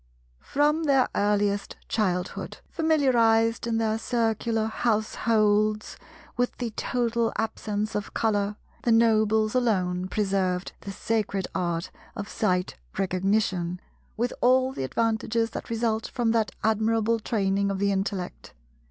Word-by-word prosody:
From 300 +3 +1
their 270 -3 +4
earliest 205 -1 +1
childhood, 180 -5 -2
familiarized 235 -8 +3
in 230 -1 0
their 220 -1 0
Circular 225 -1 0
households 215 -1 +1 0.4
with 245 0 -1
the 240 -2 -3
total 235 0 0
absence 215 -1 -2
of 205 -1 -3
Colour, 205 -2 +1 0.3
the 235 - +1
Nobles 220 -1 +3
alone 185 -7 +1
preserved 190 -3 0
the 200 - -6
Sacred 200 -2 -1
Art 175 0 -2 0.2
of 205 - -5
Sight 180 - -1 0.2
Recognition, 185 -2 0 0.4
with 240 +2 0
all 255 +1 +4
the 135 - -3
advantages 225 - 0
that - - -6
result 225 -1 0
from 235 -3 0
that 225 -2 +2
admirable 220 +1 +2
training 200 -2 0
of 195 - -1
the 200 +1 +1
intellect. 195 -2 -3
220 Hz, 120 wpm, -26 LUFS, 200-230 Hz, 0.4 s, their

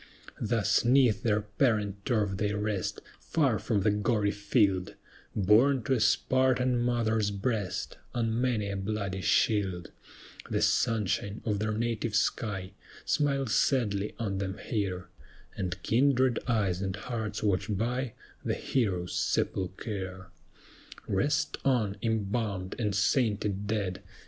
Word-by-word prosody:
Thus - - +2
'neath 120 -5 +4
their 105 -1 +2
parent 105 -2 0
turf 105 -5 +1
they 105 +1 0
rest, 105 -2 -2 0.2
Far 135 -9 +1
from 105 -4 0
the 105 +2 +3
gory 105 0 +1
field 100 -3 +1 0.4
Borne 115 +6 +4
to 130 - +1
a 125 - +2
Spartan 125 +3 +2
mother's 115 -3 +1
breast 100 -2 -2 0.2
On 115 0 0
many 110 -6 0
a - - -3
bloody 100 -1 -3
shield; 95 -4 +1 0.6
The - - 0
sunshine 105 -2 +1
of 105 -3 0
their 110 0 -1
native 115 -1 -1
sky 100 -5 0 0.3
Smiles 140 -5 +1
sadly 105 -7 +1
on 100 -4 -2
them 95 0 -3
here, 95 -5 -3 0.5
And 90 -1 -3
kindred 130 0 +3
eyes 100 -6 +1
and 95 -1 -2
hearts 110 -2 -4
watch 100 -2 +1
by 120 +4 -1 0.3
The - - 0
heroes' 95 -9 -1
sepulchre. 95 0 -2 0.8
Rest 145 +10 0
on, 115 -7 +1
embalmed 105 -3 -1
and 105 -5 0
sainted 105 -2 +1
dead! 100 -4 -2
105 Hz, 125 wpm, -29 LUFS, 100-120 Hz, 0.8 s, neath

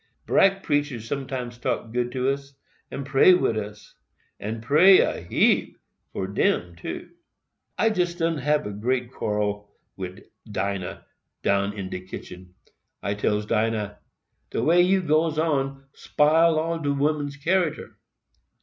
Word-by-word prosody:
Brack 195 0 +3
preachers 145 -7 -1
sometimes 130 -3 -4
talk 115 -1 -3
good 120 0 -1
to 130 0 0
us, 140 0 -6 0.3
and 140 - -5
pray 140 +6 +6
wid 145 -10 +1
us,—and 105 +1 -8
pray 175 +9 +7
a - - -1
heap 85 - +2 0.3
for 95 - -3
DEM 90 -2 0
too. 85 - -7 0.7
"I 225 - +3
jest 175 -4 -1
done 165 -2 0
hab 140 -8 -1
great 125 +1 0
quarrel 105 -2 -2 0.2
wid 95 +1 -7 0.3
Dinah, 100 -2 -3 0.4
down 100 +1 +1
in 95 -2 -5
de - - -3
kitchen. 90 -1 -10 0.5
I 100 - 0
tells 105 +1 0
Dinah, 105 -1 -1 0.5
'De - - -2
way 175 +3 +5
you 190 +1 +3
goes 155 0 +1
on 135 -4 -1
spile 160 +2 +3
all 165 +1 -1
do 145 -2 -1
women's 145 0 -1
character. 170 +2 -1
135 Hz, 135 wpm, -25 LUFS, 105-155 Hz, 0.7 s, pray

